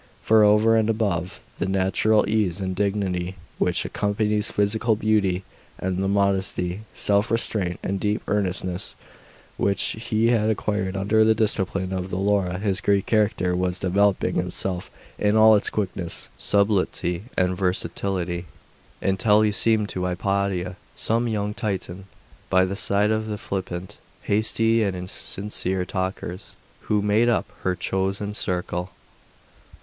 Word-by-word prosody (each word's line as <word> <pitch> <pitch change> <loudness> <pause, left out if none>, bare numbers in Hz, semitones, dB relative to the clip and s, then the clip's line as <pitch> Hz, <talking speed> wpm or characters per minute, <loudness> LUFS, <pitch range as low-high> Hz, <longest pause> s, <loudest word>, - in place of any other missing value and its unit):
For 110 -1 +5
over 105 +2 +5
and 110 0 +2
above 100 -6 -1 0.2
the - - 0
natural 95 +3 +2
ease 105 -4 +1
and 95 -1 -3
dignity 95 -2 -1 0.2
which - - +1
accompanies 105 +1 0
physical 110 +2 +1
beauty, 100 -4 +1 0.3
and 95 0 -2
the - - +1
modesty, 95 -1 0
self 100 +2 +1
restraint, 105 -6 0
and 100 0 -2
deep 105 +1 -1
earnestness 95 -2 -2 0.6
which 100 0 +1 0.3
he 110 +1 +3
had 110 -2 +2
acquired 105 -2 -1
under 105 +3 +3
the 110 0 +4
discipline 95 -3 -1
of 95 0 -3
the 90 - -3
Laura, 95 -2 +1
his 100 -1 -1
Greek 100 -1 +2
character 105 -5 +1
was 90 0 0
developing 100 +2 +1
itself 90 -2 -2 0.3
in 105 0 +2
all 110 0 +7
its 105 - +2
quickness, 95 -4 -2
subtlety, 100 -3 0
and 90 0 +2
versatility, 90 -1 -2 0.6
until 105 +2 +3
he 105 - +3
seemed 110 0 +2
to 90 0 -3
Hypatia 95 0 -1 0.2
some 115 +2 0
young 105 -2 -1
Titan, 95 -3 -4 0.4
by 95 -1 +4
the 95 +1 -3
side 100 +1 +1
of 110 0 -1
the 105 -1 -3
flippant, 95 -2 -5 0.3
hasty, 115 +2 +2
and 100 -3 0
insincere 95 0 -3
talkers 95 0 -4 0.3
who 105 -1 +2
made 105 +3 +3
up 115 - +1 0.2
her 95 -1 0
chosen 95 +3 -2
circle. 90 -2 -3
100 Hz, 135 wpm, -24 LUFS, 95-105 Hz, 0.6 s, all